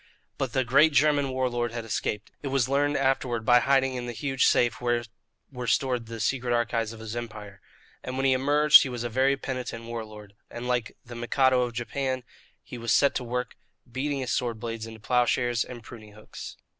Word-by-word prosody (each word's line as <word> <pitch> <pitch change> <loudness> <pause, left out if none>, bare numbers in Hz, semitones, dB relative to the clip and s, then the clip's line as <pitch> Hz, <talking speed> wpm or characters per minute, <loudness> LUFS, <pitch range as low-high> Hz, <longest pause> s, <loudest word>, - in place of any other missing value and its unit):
But 135 -4 -2
the 130 - +2
great 140 +6 +4
German 145 0 +3
war 130 0 0
lord 120 -1 -2
had 115 -1 -5
escaped 105 -1 -3
it - - -5
was 135 -3 +1
learned, 145 +2 +1
afterward, 130 -4 0
by 125 +1 +6
hiding 135 0 +2
in 125 -1 -4
the 120 - -4
huge 135 +2 +1
safe 120 -2 +2
where 120 -1 +1 0.5
were 125 -2 -6
stored 125 -3 0
the 115 0 -7
secret 125 0 0
archives 115 -2 0
of 115 - -10
his 110 0 -6
empire. 105 -4 -7 0.4
And 130 +1 -5
when 135 - 0
he 135 - +5
emerged 145 +3 +6
he 135 - -1
was 120 -2 -4
a 120 - -2
very 135 +4 +2
penitent 125 -4 -5
war 115 -1 -5
lord, 105 -2 -12 0.2
and 120 +1 -6
like 125 -2 -1
the 120 - -10
Mikado 125 +2 +2
of 120 -1 -2
Japan 130 +2 -3 0.4
he 125 - -9
was 115 0 -2
set 140 - +4
to - - -2
work 125 0 -3 0.4
beating 135 +2 -2
his 125 - -3
sword 120 -3 -1
blades 115 -1 -5
into 110 0 -10
ploughshares 120 0 +1
and 120 -2 -10
pruning 110 -3 -12
hooks. 105 +1 -10
125 Hz, 205 wpm, -27 LUFS, 115-135 Hz, 0.5 s, by